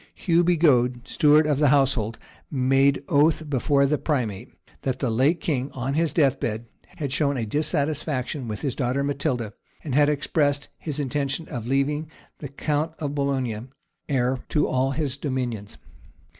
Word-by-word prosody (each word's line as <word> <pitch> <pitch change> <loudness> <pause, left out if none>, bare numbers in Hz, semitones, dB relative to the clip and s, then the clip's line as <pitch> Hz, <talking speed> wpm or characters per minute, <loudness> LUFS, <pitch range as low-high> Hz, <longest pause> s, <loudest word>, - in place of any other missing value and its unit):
Hugh 170 -1 +2
Bigod, 130 -8 +3
steward 150 +1 +4
of 150 -2 +1
the 150 - +4
household, 130 -5 +2 0.3
made 135 +1 +2
oath 155 +2 +3
before 140 0 +2
the 150 +2 +1
primate, 120 -11 -2 0.3
that 130 -2 -1
the 130 -3 -1
late 135 +9 +2
king, 140 -4 -1
on 130 +1 -2
his 160 +1 +1
death 140 -6 +2
bed, 110 +1 -3 0.3
had 145 -6 -4
shown 145 -2 +1
a 115 - -1
dissatisfaction 145 -1 -2
with 105 -2 -5
his 135 -4 -1
daughter 130 +3 -1
Matilda, 140 -6 -2 0.3
and 145 - -4
had 145 +2 +4
expressed 145 -1 0
his 150 -3 -4
intention 140 +2 -2
of 120 -6 -5
leaving 145 +4 0 0.3
the 145 - -5
count 150 +3 -1
of 145 -3 -3
Boulogne 130 -5 -2 0.4
heir 130 -1 +1
to 150 -2 +2
all 130 +1 +1
his 140 -1 -2
dominions. 125 -7 -3
140 Hz, 155 wpm, -24 LUFS, 125-150 Hz, 0.4 s, steward